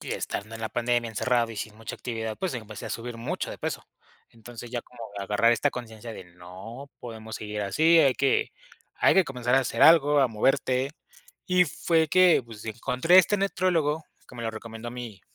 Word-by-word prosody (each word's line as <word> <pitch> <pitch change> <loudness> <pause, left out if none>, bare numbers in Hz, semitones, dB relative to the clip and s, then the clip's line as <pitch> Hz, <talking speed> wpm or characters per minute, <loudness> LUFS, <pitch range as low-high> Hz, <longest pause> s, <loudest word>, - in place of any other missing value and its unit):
y - - -9
estando 105 +3 -4
en - - -12
la 110 - -2
pandemia 120 0 0
encerrado 115 +1 0
y 110 - -10
sin 105 +1 -6
mucha 110 0 -7
actividad, 110 -2 -5
pues 185 -6 -3
empecé 110 -3 -7
a - - -6
subir 120 0 -5
mucho 115 - -4
de - - -8
peso. - - -4 0.5
Entonces, 115 +1 -11
ya 120 -2 -3
como 125 - -17 0.2
agarrar 105 +4 +3
esta 130 +5 +1
conciencia 115 -2 -8
de: 95 - -9
"No 95 +10 -11
podemos 110 -2 -8
seguir 105 0 -5
así, 160 +12 +4
hay 135 -4 +4
que 135 -1 +1 0.5
hay - - +4
que 190 -2 +5
comenzar 125 -1 -1
a 135 - +5
hacer 120 -3 -3
algo, 150 -3 +7
a 135 - +5
moverte". 130 +3 +1 0.6
Y 180 0 +4
fue 160 0 +1
que, 180 -4 +5
pues, 110 -3 -11
encontré 125 - +3
este 205 +3 +4
nutriólogo, 170 -6 0 0.2
como 120 -2 -9
lo 115 - -2
recomendó 115 +1 -8
mi 120 -5 -8
120 Hz, 190 wpm, -26 LUFS, 110-140 Hz, 0.6 s, algo